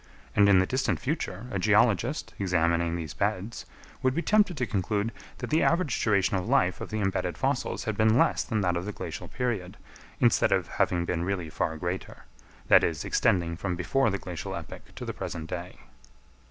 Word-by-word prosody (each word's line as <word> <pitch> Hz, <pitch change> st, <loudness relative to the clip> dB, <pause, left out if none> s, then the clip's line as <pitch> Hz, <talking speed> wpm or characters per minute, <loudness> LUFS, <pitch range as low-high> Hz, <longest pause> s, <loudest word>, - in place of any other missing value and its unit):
And 100 Hz, 0 st, +6 dB
in 100 Hz, -, +7 dB
the 95 Hz, -, +4 dB
distant 130 Hz, +6 st, 0 dB
future, 145 Hz, -2 st, -3 dB
a 100 Hz, -, -1 dB
geologist, 110 Hz, -, +2 dB
examining 85 Hz, -2 st, +1 dB
these 80 Hz, -3 st, -5 dB
beds, 105 Hz, +3 st, -2 dB, 0.3 s
would 130 Hz, 0 st, +1 dB
be 170 Hz, -, 0 dB
tempted 210 Hz, -6 st, +3 dB
to 125 Hz, -, 0 dB
conclude 105 Hz, +1 st, -1 dB, 0.3 s
that -, -, -6 dB
the 155 Hz, -, +3 dB
average 170 Hz, -7 st, +1 dB
duration 100 Hz, -3 st, +2 dB
of 90 Hz, -, -3 dB
life 90 Hz, +1 st, +2 dB
of -, -, -5 dB
the 110 Hz, -, -2 dB
embedded 95 Hz, -3 st, -1 dB
fossils 135 Hz, -1 st, -1 dB
had 110 Hz, -, -2 dB
been 110 Hz, +2 st, +4 dB
less -, -, +3 dB
than 110 Hz, -4 st, -1 dB
that 90 Hz, -2 st, +1 dB
of 85 Hz, +1 st, -2 dB
the 105 Hz, -, -4 dB
glacial -, -, -6 dB
period, 110 Hz, -8 st, -3 dB, 0.4 s
instead -, -, +4 dB
of -, -, +2 dB
having 85 Hz, -1 st, 0 dB
been 85 Hz, -1 st, -1 dB
really 90 Hz, -4 st, -2 dB
far 80 Hz, +1 st, -2 dB
greater, 90 Hz, +4 st, -5 dB, 0.4 s
that -, -, +7 dB
is, 80 Hz, -3 st, -1 dB
extending 85 Hz, -2 st, +1 dB
from 90 Hz, +1 st, -3 dB
before 115 Hz, +9 st, +1 dB
the 100 Hz, -, -1 dB
glacial 90 Hz, -3 st, -6 dB
epoch -, -, -9 dB
to -, -, -6 dB
the -, -, -4 dB
present 80 Hz, -1 st, -5 dB
day. 90 Hz, +1 st, -6 dB
100 Hz, 195 wpm, -28 LUFS, 90-115 Hz, 0.4 s, in